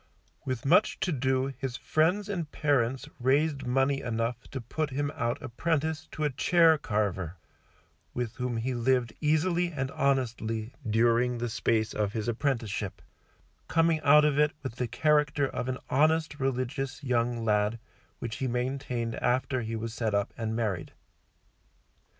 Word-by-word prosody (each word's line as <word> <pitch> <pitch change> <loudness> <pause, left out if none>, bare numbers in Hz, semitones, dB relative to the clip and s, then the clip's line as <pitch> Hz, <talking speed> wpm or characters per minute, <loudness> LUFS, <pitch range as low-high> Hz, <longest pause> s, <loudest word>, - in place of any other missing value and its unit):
With 130 -2 -3
much 180 +9 +4
to 180 - +1
do 130 -1 0
his 130 -2 -3
friends 180 +7 +1
and 175 -7 -3
parents 135 -4 +1
raised 140 +1 +1
money 135 +2 +2
enough 115 0 -2
to 135 - -5
put 150 +6 -3
him 145 +1 -2
out 120 +1 -1
apprentice 160 +4 -1
to 155 - -3
a 150 - +1
chair 165 +3 +4
carver, 100 - -1 0.8
with 120 -2 -4
whom 125 -2 -2
he 125 +3 -1
lived 120 -1 +1
easily 170 +3 +2
and 135 -4 -3
honestly 115 -4 -1 0.2
during 120 +2 +3
the 120 0 -2
space 110 0 0
of 105 -1 -1
his 110 -1 -3
apprenticeship, 115 -5 -2 0.7
coming 165 -1 +3
out 150 +1 +6
of 150 -1 +2
it 150 0 +3
with 125 -3 -5
the 125 - -1
character 150 +2 +2
of 125 -1 -4
an 130 - -2
honest 155 +2 +2
religious 135 +1 -2
young 120 -2 0
lad, 105 +1 +2 0.4
which 115 -2 -5
he 135 - -1
maintained 125 -1 -2
after 130 +1 0
he 115 0 -4
was 110 0 -4
set 110 -3 -1
up 100 0 0
and 110 -1 -3
married. 105 -7 -2
130 Hz, 150 wpm, -29 LUFS, 115-145 Hz, 0.8 s, out